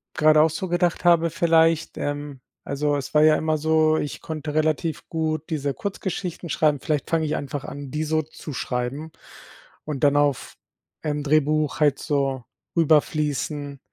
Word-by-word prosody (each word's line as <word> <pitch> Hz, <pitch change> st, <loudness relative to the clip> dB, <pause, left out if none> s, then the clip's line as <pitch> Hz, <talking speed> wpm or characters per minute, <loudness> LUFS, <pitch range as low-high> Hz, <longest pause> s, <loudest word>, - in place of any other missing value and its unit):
grade 155 Hz, 0 st, +5 dB
auch 160 Hz, -, +4 dB
so 185 Hz, +4 st, -4 dB
gedacht 175 Hz, 0 st, 0 dB
habe 170 Hz, -1 st, +5 dB
vielleicht: 165 Hz, -1 st, +2 dB
„Ähm, 145 Hz, -2 st, -4 dB, 0.2 s
also, 145 Hz, +1 st, -1 dB
es 135 Hz, -, -6 dB
war 150 Hz, -, +5 dB
ja 155 Hz, 0 st, +6 dB
immer 155 Hz, 0 st, 0 dB
so, 155 Hz, 0 st, +3 dB
ich 145 Hz, -4 st, -4 dB
konnte 155 Hz, -2 st, -5 dB
relativ 155 Hz, +1 st, 0 dB
gut 155 Hz, -1 st, -2 dB
diese 145 Hz, -3 st, -1 dB
Kurzgeschichten 185 Hz, -3 st, -4 dB
schreiben. 150 Hz, -1 st, +2 dB
Vielleicht 150 Hz, 0 st, -2 dB
fange 160 Hz, -1 st, +2 dB
ich 155 Hz, 0 st, -1 dB
einfach 140 Hz, -1 st, -4 dB
an, 140 Hz, -2 st, -7 dB
die 155 Hz, +1 st, -2 dB
so 155 Hz, 0 st, +1 dB
zu 155 Hz, 0 st, -9 dB
schreiben 130 Hz, +6 st, -3 dB, 0.7 s
und 150 Hz, -2 st, -5 dB
dann 145 Hz, 0 st, +4 dB
auf, 145 Hz, -3 st, 0 dB, 0.5 s
ähm, 150 Hz, -1 st, -1 dB
Drehbuch 150 Hz, 0 st, +1 dB
halt 145 Hz, -2 st, +3 dB
so 135 Hz, -4 st, -1 dB, 0.3 s
rüber 160 Hz, -3 st, +5 dB
fließen 145 Hz, -1 st, -3 dB
155 Hz, 165 wpm, -24 LUFS, 145-160 Hz, 0.7 s, ja